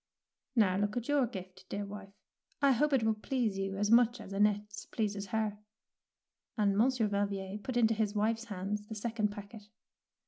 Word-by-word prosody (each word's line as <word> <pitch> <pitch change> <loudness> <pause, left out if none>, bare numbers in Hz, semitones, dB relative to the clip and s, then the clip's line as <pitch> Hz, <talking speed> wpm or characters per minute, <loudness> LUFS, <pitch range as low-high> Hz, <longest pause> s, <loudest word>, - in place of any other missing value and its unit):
"Now 195 -5 +4
look 205 +3 0
at 240 - -3
your 290 -4 +3
gift, 185 -4 -9
dear 205 0 -3
wife. 200 -1 -9 0.4
I 280 -1 +5
hope 295 +4 +2
it 265 -4 +3
will 220 0 +3
please 215 -2 -1
you 195 0 -2
as 205 +1 +1
much 240 0 +5
as 195 - -8
Annette's 205 0 0
pleases 205 -3 -2
her"; 215 0 -1 1.0
and 200 -2 +3
Monsieur 235 +1 +3
Valvier 200 -1 -2
put 245 +4 -3
into 225 -2 +4
his 215 -1 -1
wife's 225 +2 +1
hands 205 0 -4
the 220 - -6
second 220 0 0
packet. 205 +1 -9
210 Hz, 175 wpm, -32 LUFS, 200-230 Hz, 1.0 s, I